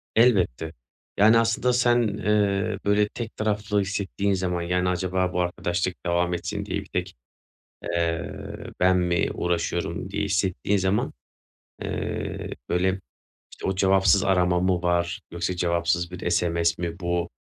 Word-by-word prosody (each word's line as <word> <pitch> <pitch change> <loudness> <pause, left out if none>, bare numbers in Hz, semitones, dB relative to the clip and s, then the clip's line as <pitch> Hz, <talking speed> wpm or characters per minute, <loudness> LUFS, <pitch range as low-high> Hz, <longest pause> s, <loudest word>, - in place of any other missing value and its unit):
Elbette, 90 - +3 0.4
yani 110 +3 +6
aslında 115 +2 +2
sen, 120 0 +4
eee, 105 0 +1
böyle, 105 0 +3
tek 115 -2 -6
taraflı 105 -1 0
hissettiğin 100 0 -1
zaman, 90 -2 -1
yani 90 +1 0
acaba 90 0 0
bu 90 - +1
arkadaşlık 90 +1 -2
devam 85 0 +1
etsin 85 - -3
diye - - -2
bir - - -12
tek, - - -3 0.7
eee, 85 -1 -1 0.5
"ben 90 0 +5
mi 90 -1 +1
uğraşıyorum" 85 +1 -2
diye 105 - -1
hissettiğin 100 +1 0
zaman, 95 +2 0 0.7
eee, - - -4 0.2
böyle, 95 +2 +1 0.5
işte, - - -7
o 95 - +1
cevapsız 95 0 +4
arama 90 -2 +3
mı 90 -1 +1
var, 85 0 0
yoksa 85 +1 -2
cevapsız 85 0 0
bir 90 -1 -3
SMS 85 -1 +1
mi 85 +1 -4
bu, 85 -1 -1
90 Hz, 140 wpm, -25 LUFS, 85-100 Hz, 0.7 s, yani